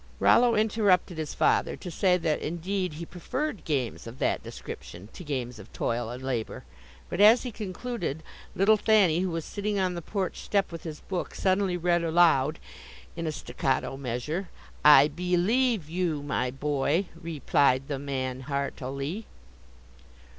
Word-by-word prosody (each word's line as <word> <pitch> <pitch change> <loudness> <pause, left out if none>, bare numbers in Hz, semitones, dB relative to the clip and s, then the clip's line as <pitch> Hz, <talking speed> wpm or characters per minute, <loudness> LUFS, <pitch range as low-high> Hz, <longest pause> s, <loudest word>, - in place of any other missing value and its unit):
Rollo 240 -1 +5
interrupted 205 -6 +2
his 155 -2 -4
father - - +2
to 180 - -7
say 180 +2 +3
that 160 -3 -1
indeed 180 +2 -2
he 165 +3 -6
preferred 245 - -4
games 135 -7 -2
of 115 +3 -9
that - - 0
description 90 +5 -9
to - - -9
games 125 -6 -4
of 100 - -13
toil 115 -1 -2
and 125 +2 -7
labor, 125 -4 -3 0.4
but - - -2
as 220 +4 +7
he 250 - -4
concluded, 200 - -4 0.3
little 215 +3 +5
Thanny, 200 -7 +4
who 185 0 0
was 165 -2 -3
sitting 205 0 -2
on 185 -2 +1
the 170 - -5
porch 190 +2 -3
step 200 -2 0
with 165 -1 -7
his 155 -2 -6
book, 185 -2 -4
suddenly 190 -1 +1
read 175 0 +1
aloud, 160 -3 +4 0.6
in 165 -1 -3
a - - 0
staccato 135 -3 -2
measure. 140 +8 -3 0.3
"I 145 -1 +9
be 180 +4 -1
lieve 225 - +2
you 165 -3 -1
my 130 -3 -1
boy, 145 +6 0
re 165 -2 -7
plied 135 0 +3
the 140 -2 -3
man 130 -2 -3
heart 140 0 -2
i - - -5
ly." 140 +11 -4
165 Hz, 165 wpm, -27 LUFS, 140-190 Hz, 0.6 s, I